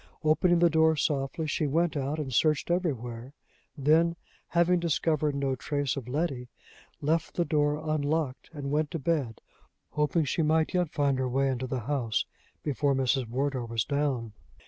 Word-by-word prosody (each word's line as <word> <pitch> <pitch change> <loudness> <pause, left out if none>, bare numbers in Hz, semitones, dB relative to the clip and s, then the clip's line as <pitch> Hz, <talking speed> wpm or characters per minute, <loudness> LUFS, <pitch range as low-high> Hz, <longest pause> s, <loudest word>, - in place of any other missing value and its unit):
Opening 170 +3 +3
the 170 0 +5
door 160 0 +4
softly, 145 +1 -1
she 155 0 0
went 165 +4 +1
out 140 +2 -1
and 140 -4 -4
searched 155 +5 +2
everywhere; 130 -8 -2 0.4
then, 160 +4 +3 0.3
having 175 +1 +3
discovered 155 -3 0
no 135 -1 0
trace 145 +1 -2
of 130 -4 -6
Letty, 135 -3 -2 0.5
left 160 +3 0
the 175 - +1
door 150 -2 +1
unlocked, 155 -3 -2
and 140 -3 -5
went 150 0 +1
to 170 - -3
bed, 140 -7 -1 0.5
hoping 150 +2 +1
she 145 - 0
might 160 +2 +2
yet 180 -3 +1
find 140 -3 +1
her 130 -1 0
way 135 +2 +1
into 130 0 -2
the 130 -1 -2
house 120 -3 -1 0.4
before 145 -1 +1
Mrs. 130 -1 +1
Wardour 130 0 -1
was 115 -1 -1
down. 135 -6 -1
145 Hz, 165 wpm, -28 LUFS, 130-160 Hz, 0.5 s, the